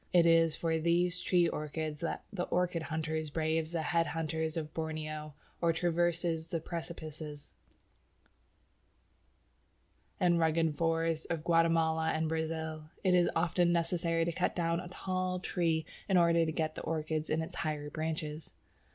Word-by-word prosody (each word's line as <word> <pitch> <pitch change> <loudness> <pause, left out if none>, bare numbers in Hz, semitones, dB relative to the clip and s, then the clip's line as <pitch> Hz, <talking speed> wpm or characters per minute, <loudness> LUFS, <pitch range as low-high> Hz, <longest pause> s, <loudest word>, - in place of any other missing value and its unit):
It 175 -2 +6
is 165 -1 +5
for 165 -1 0
these 175 +2 +2
tree 180 -2 +3
orchids 155 -1 -3
that 170 - -2
the 180 -3 -1
orchid 180 -1 0
hunter 160 +1 -2
braves 160 +1 0
the 165 -2 -1
head 165 +2 +2
hunters 160 0 -2
of 155 -1 -4
Borneo 155 -2 -4 0.3
or 170 -1 +4
traverses 170 -1 0
the 165 - -2
precipices 155 -3 -7 2.7
and 175 -2 +4
rugged 160 -1 +2
forests 165 0 0
of 165 -2 -2
Guatemala 165 -1 +3
and 160 0 0
Brazil. 160 -1 -3
It 185 -2 +4
is 175 -1 +5
often 175 +1 +2
necessary 170 -1 +1
to 170 - 0
cut 180 +2 0
down 170 -1 +1
a 180 - -6
tall 185 0 -2
tree 165 -3 0 0.2
in 190 - +5
order 170 -1 +4
to - - 0
get 155 0 -1
the - - -6
orchids 155 -1 -2
in 160 +1 +1
its 175 +2 -8
higher 150 -2 -2
branches. 155 - -4
165 Hz, 150 wpm, -32 LUFS, 155-170 Hz, 2.7 s, It